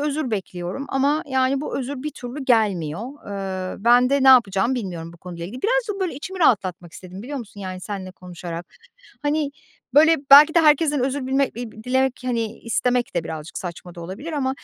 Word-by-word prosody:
özür 295 -2 -1
bekliyorum 190 +4 -4
ama, 285 +3 +1
yani, 265 0 +1
bu 300 - -3
özür 265 0 -5
bir 300 - -3
türlü 260 +2 -7
gelmiyor. 200 - +1 0.7
Iıı, 200 - -11
ben 245 +2 +5
de 280 -1 +2
ne 265 - +6
yapacağımı 230 -1 +5
bilmiyorum 175 -7 -5
bu 170 - -16
konuyla 170 -1 -8
ilgili. 245 +7 -9
Birazcık 460 -3 0
böyle 365 -6 -1
içimi 370 +7 -7
rahatlatmak 185 - +1
istedim 185 +1 -10
biliyor 280 +3 -5
musun 210 -3 -10
yani 185 -1 -6
seninle 190 -1 -6
konuşarak? 175 -2 -8 0.6
Hani, 295 0 0 0.4
böyle, 320 +3 +7
belki 295 +3 +9
de 335 - +6
herkesten 300 -2 +4
özür 270 0 -2
bilme 270 +1 +1
iii, 220 -2 -8
dilemek, 260 0 +1
hani 230 -3 -2
istemek 245 +1 0
de 165 - 0
birazcık 160 0 -6
saçma 175 -1 -8
da 170 - -9
olabilir 195 - -7
ama 270 -3 0
250 Hz, 185 wpm, -22 LUFS, 185-280 Hz, 0.7 s, belki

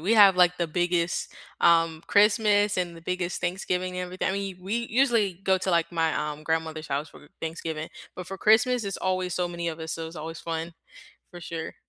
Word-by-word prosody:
We 195 +8 +1
have, 200 -3 +8
like, 180 0 +5
the 170 - +1
biggest, 175 +1 0 0.3
um, 165 -1 +4
Christmas 205 -1 +4
and 175 -2 -2
the - - -11
biggest 180 +1 -3
Thanksgiving 180 0 -2
and 180 - -2
everything 185 +1 -2
I - - 0
mean, 195 -2 -3
we 225 +5 -2
usually 230 -6 +3
go 190 0 +4
to, 185 - -1
like, 170 0 +1
my, 165 -1 +1
um, 150 0 -3
grandmother's 160 0 -2
house 145 +3 -2
for 150 - -16
Thanksgiving. 160 -1 -4 0.3
But 180 -2 -6
for 195 - -6
Christmas 225 +5 +4
it's 195 -1 -3
always 185 -1 -1
so 180 +1 0
many 170 -1 -4
of 165 0 -5
us, 160 0 -5
so 165 -1 -4
it's 165 - -12
always 160 +1 -6
fun, 165 0 -4 0.6
for 175 - -10
sure. 165 -1 -6
175 Hz, 205 wpm, -26 LUFS, 165-190 Hz, 0.6 s, have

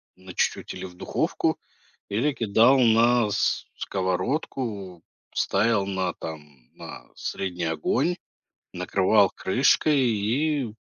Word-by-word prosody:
на 95 0 -12
чуть-чуть, - - -1
или - - -7
в 90 -1 -11
духовку, - - -1 0.5
или 120 +9 +1
кидал 115 +4 +4
на 115 -1 +4
с 100 0 0
сковородку, 95 - -3 0.3
ставил 105 0 +1
на, 95 -2 -2
там, 75 -6 -10
на - - -10
средний 90 -2 -4
огонь, 100 - 0 0.6
накрывал 95 +2 +3
крышкой, 135 +9 +2
и 125 +3 0
100 Hz, 105 wpm, -25 LUFS, 95-120 Hz, 0.6 s, кидал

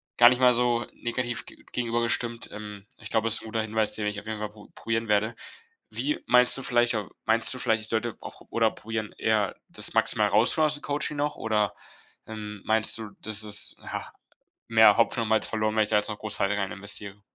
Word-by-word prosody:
gar 120 0 +8
nicht 125 0 0
mal 125 -1 +6
so 120 0 +1
negativ 120 0 -3
g - - -13 0.2
gegenüber 120 -1 -1
gestimmt. 115 0 0
Ähm, 105 -1 -9
ich 110 - -9
glaube, 110 0 +1
ist 115 0 +4
'n - - -10
guter 110 0 -2
Hinweis, 110 0 0
den 105 -1 -1
ich 105 -1 -3
auf - - -23
jeden 110 -1 -5
Fall 105 0 -3
pro 105 -1 -15
probieren 115 -1 -3
werde. 105 +2 +1 0.5
Wie 300 +2 -2
meinst 125 +1 +6
du - - -5
vielleicht 120 -1 +2
au 105 -3 -3 0.2
meinst 115 +2 +3
du - - -6
vielleicht, 110 -2 +1
ich - - -1
sollte 115 0 -2
auch - - -10
oder 115 -1 +2
probieren 110 -1 -5
eher 110 -3 +1
das - - -1
Maximale 105 -1 +2
rauszuholen 120 +9 +6
aus 150 0 +2
dem 145 - -7
Coaching 150 +1 -1
noch? 145 +1 -2
Oder, 105 -3 0 0.5
ähm, 105 -2 -7
meinst 110 0 +1
du, 110 -2 -7
das 110 0 -2
ist, 105 -1 -4
ja, - - -6 0.6
mehr 110 -2 +7
Hopfen 115 0 +2
und - - -3
Malz 110 0 +2
verloren, 110 -1 -1
wenn 110 - +4
ich 105 - -3
da 105 - +4
jetzt 105 - 0
noch 105 - -5
groß 105 -1 -3
weiter 100 +1 +1
reininvestiere? 100 0 -4
110 Hz, 220 wpm, -26 LUFS, 105-120 Hz, 0.6 s, gar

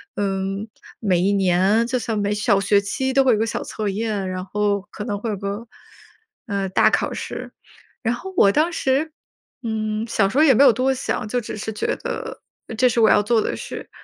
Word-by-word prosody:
嗯， 195 +1 -2 0.3
每 185 -5 +1
一 195 +3 +2
年， 195 +4 +3
就 255 0 0
算 225 -2 -3
每 205 0 0
小 205 -1 +2
学 200 0 +3
期 265 +6 -2
都 270 0 +5
会 250 - +5
有 - - +2
个 225 - +2
小 - - -3
测 215 -2 -3
验， 205 -2 -2
然 185 0 -4
后 205 0 0
可 210 - -6
能 205 -3 -3
会 225 - -4
有 - - -2
个， 200 +4 -5 0.8
呃， 200 -2 -2
大 - - +4
考 - - 0
试。 - - -6 0.5
然 235 +1 +1
后 380 +8 -8
我 200 - +6
当 315 +9 +2
时， 285 +2 0 0.5
嗯， 215 -1 -2
小 200 -3 +2
时 255 - -4
候 310 - +6
也 270 - +6
没 275 - +5
有 260 - +8
多 260 +3 +1
想， 250 -3 -3
就 245 +2 -1
只 215 - -7
是 220 +1 -4
觉 - - -1
得 - - -6 0.4
这 255 +1 +4
是 235 0 +1
我 220 - +6
要 - - +5
做 225 +1 +2
的 - - -2
事， - - -7
215 Hz, 230 characters per minute, -22 LUFS, 200-240 Hz, 0.8 s, 有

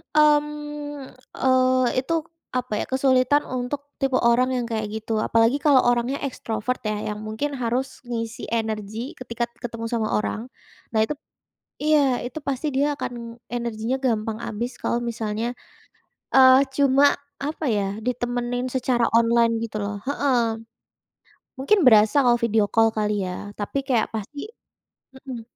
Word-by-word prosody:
mmm, 295 -1 +1 0.2
eee, 255 -1 +3
itu 265 +6 -2 0.4
apa 250 -3 -2
ya, - - -2
kesulitan 260 +1 +3
untuk 265 +3 -4
tipe 270 -1 +1
orang 240 +1 +3
yang 245 -1 -1
kayak 220 -2 -2
gitu. 220 0 -2
Apalagi 230 +5 +3
kalau 280 -3 +5
orangnya 245 +3 +1
ekstrovert 250 -2 -3
ya, 210 0 -2
yang 210 - -6
mungkin 220 +7 -2
harus 250 +2 -2
ngisi 230 -2 -4
energi 220 +2 -3
ketika 235 -2 -4 0.2
ketemu 230 -2 -5
sama 225 -2 0
orang. 220 +2 -2 0.5
Nah 220 - +4
itu 220 - -1 0.7
iya, 290 -5 +3
itu 245 +5 -5
pasti 280 0 -3
dia 285 +2 +1
akan 235 -4 -6 0.2
energinya 235 +1 -2
gampang 225 -4 -1
habis 235 +3 -3
kalau 235 - 0
misalnya, 225 0 -2 0.8
eee, 260 0 +8
cuma 275 0 +4 0.4
apa 305 +2 -3
ya, 200 -3 0
ditemenin 245 0 -2
secara 250 -2 +1
online 230 0 +3
gitu 215 -1 -6
loh, 205 0 -3
heeh. 280 -3 +2 1.2
Mungkin 280 +11 +3
berasa 220 +4 +6
kalau 240 -1 +5
video 225 -2 +2
call 225 0 +4
kali 210 -2 0
ya, 180 +3 -6
tapi 205 +6 -2
kayak 240 -4 +2
pasti 225 - -5 0.8
hmm. 255 -4 -6
245 Hz, 140 wpm, -24 LUFS, 225-265 Hz, 1.2 s, eee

